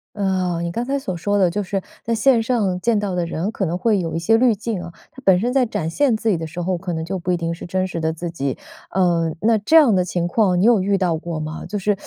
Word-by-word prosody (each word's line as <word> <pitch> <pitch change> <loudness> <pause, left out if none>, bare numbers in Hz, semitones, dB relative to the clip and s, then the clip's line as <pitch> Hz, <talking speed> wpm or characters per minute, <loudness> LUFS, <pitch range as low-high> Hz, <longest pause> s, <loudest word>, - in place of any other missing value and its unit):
哦， 185 -4 0
你 170 0 -3
刚 235 +6 -2
才 275 +3 -1
所 190 -10 -4
说 205 +5 -1
的 185 -3 +3
就 205 +4 -2
是 195 0 -2 0.2
在 230 - -1
线 230 +1 +3
上 215 -6 0
见 230 +2 +2
到 205 -3 -2
的 175 -1 0
人， 170 +5 -3
可 195 - -2
能 170 +1 -2
会 210 +1 +2
有 165 -2 -3
一 - - -1
些 170 +7 +3
滤 240 -1 +4
镜 210 -2 -4
啊， 175 - -7 0.2
他 265 - -13
本 190 -2 +5
身 240 +6 -1
在 265 -1 +3
展 205 -7 -3
现 245 - +2
自 225 - -2
己 195 - +2
的 165 0 -5
时 160 +3 -7
候， 180 +1 -1
可 175 +1 -5
能 160 0 -3
就 190 +3 -3
不 180 +1 -3
一 180 - +2
定 170 -1 -2
是 165 - -9
真 185 +1 -1
实 170 -2 -5
的 160 0 0
自 170 +1 -5
己。 140 -5 -3 0.3
呃， 170 -3 +1
那 225 +1 +3
这 210 +11 +3
样 285 -9 +7
的 180 -1 +2
情 175 -1 -2
况 185 -1 +2
你 - - +2
有 230 -3 +5
遇 200 +1 +1
到 180 -4 +1
过 165 0 -5
吗？ 155 +1 -5
就 205 - -3
是 205 +1 0
185 Hz, 315 characters per minute, -21 LUFS, 170-220 Hz, 0.3 s, 样